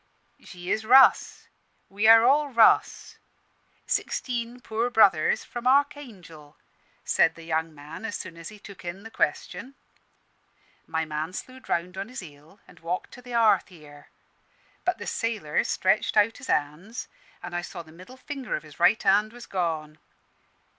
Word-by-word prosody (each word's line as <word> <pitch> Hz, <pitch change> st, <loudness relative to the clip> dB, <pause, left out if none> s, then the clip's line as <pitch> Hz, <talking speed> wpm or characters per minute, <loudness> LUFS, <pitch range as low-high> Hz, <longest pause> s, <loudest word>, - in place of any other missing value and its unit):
'She 180 Hz, 0 st, -7 dB
is 220 Hz, -, 0 dB
Russ 260 Hz, +4 st, +5 dB, 0.4 s
we 205 Hz, +3 st, 0 dB
are 225 Hz, 0 st, +9 dB
all 290 Hz, +3 st, +4 dB
Russ; 230 Hz, -4 st, +3 dB, 0.7 s
sixteen 240 Hz, -1 st, -2 dB
poor 230 Hz, 0 st, -2 dB
brothers 195 Hz, -9 st, +4 dB
from 240 Hz, +1 st, -5 dB
Archangel,' 220 Hz, -, -1 dB, 0.5 s
said -, -, +3 dB
the 165 Hz, -, -12 dB
young 160 Hz, 0 st, -2 dB
man, 150 Hz, +5 st, -11 dB
as 220 Hz, -2 st, -4 dB
soon 185 Hz, -3 st, -8 dB
as 165 Hz, 0 st, -9 dB
he 210 Hz, -, -13 dB
took 200 Hz, -2 st, -13 dB
in 175 Hz, +3 st, -7 dB
the 225 Hz, -, -10 dB
question. 205 Hz, -, -2 dB, 1.1 s
My 160 Hz, 0 st, -1 dB
man 155 Hz, +3 st, -4 dB
slewed 255 Hz, +6 st, -9 dB
round 180 Hz, +2 st, -2 dB
on 200 Hz, +3 st, -5 dB
his 255 Hz, -, -7 dB
heel, 155 Hz, +3 st, -15 dB
and 175 Hz, -, -18 dB
walked 170 Hz, +2 st, -4 dB
to 245 Hz, -, -12 dB
the 245 Hz, 0 st, -10 dB
hearth 230 Hz, -2 st, +3 dB
here; 150 Hz, -5 st, -15 dB, 0.8 s
but 360 Hz, 0 st, +1 dB
the -, -, -8 dB
sailor 215 Hz, -10 st, -1 dB
stretched 190 Hz, +3 st, +1 dB
out 210 Hz, +2 st, +3 dB
his 270 Hz, -, -10 dB
hands, 160 Hz, +11 st, -2 dB, 0.4 s
an' 175 Hz, -, -7 dB
I 175 Hz, -, -1 dB
saw 175 Hz, -, -8 dB
the 160 Hz, -, -17 dB
middle 185 Hz, +10 st, -14 dB
finger 270 Hz, -3 st, -5 dB
of 155 Hz, -, -6 dB
his 150 Hz, -2 st, -16 dB
right 225 Hz, -, +4 dB
hand 210 Hz, +2 st, +3 dB
was 240 Hz, 0 st, -11 dB
gone. 160 Hz, -4 st, -3 dB
195 Hz, 160 wpm, -26 LUFS, 165-235 Hz, 1.1 s, are